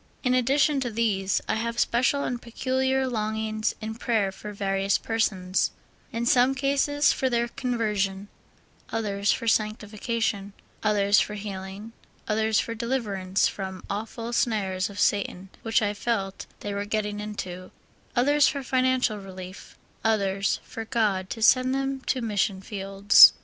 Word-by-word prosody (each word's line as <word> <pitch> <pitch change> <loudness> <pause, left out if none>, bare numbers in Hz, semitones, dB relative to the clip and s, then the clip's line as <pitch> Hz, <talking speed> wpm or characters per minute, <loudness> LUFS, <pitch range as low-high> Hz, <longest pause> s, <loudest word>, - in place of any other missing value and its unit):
In 250 -2 +2
addi 255 +2 +2
tion 290 -1 +3
to 255 -2 -1
these, 210 -4 0
I - - +1
have 235 +1 -3
special 255 +4 +2
and 245 -1 -3
peculiar 260 +2 0
longings 215 -2 -1
in 220 0 -4
prayer 220 -4 0
for 210 +2 -8
various 195 -1 +1
persons; 190 -5 0 0.4
in 235 -1 -2
some 250 +2 +4
cases 280 +2 +2
for 260 - 0
their 235 -1 +1
conversion, 210 -6 -1 0.6
others 205 -2 0
for 230 - -2
sanctification, 215 -1 -1 0.3
others 205 -1 +4
for 210 - -1
healing, 200 +1 -7 0.4
others 220 0 +2
for 230 - -2
deliverance 215 -6 0
from 190 -2 -6
awful 225 +3 -4
snares 200 -4 0
of 200 0 -8
Satan 195 -2 0
which 225 -1 +2
I 205 0 +1
felt 200 -3 -2
they 205 - -4
were 200 0 -2
getting 210 0 -2
into, 185 -4 -6 0.5
others 290 +4 +4
for 280 0 -2
financial 255 -4 +1
relief, 190 -1 -10 0.3
others 200 -3 +1
for 225 - -6
God 210 -5 0
to 225 - -4
send 255 +2 +5
them 270 0 -2
to 255 - +1
mission 205 -3 0
fields. 195 0 +6
215 Hz, 145 wpm, -26 LUFS, 200-240 Hz, 0.6 s, fields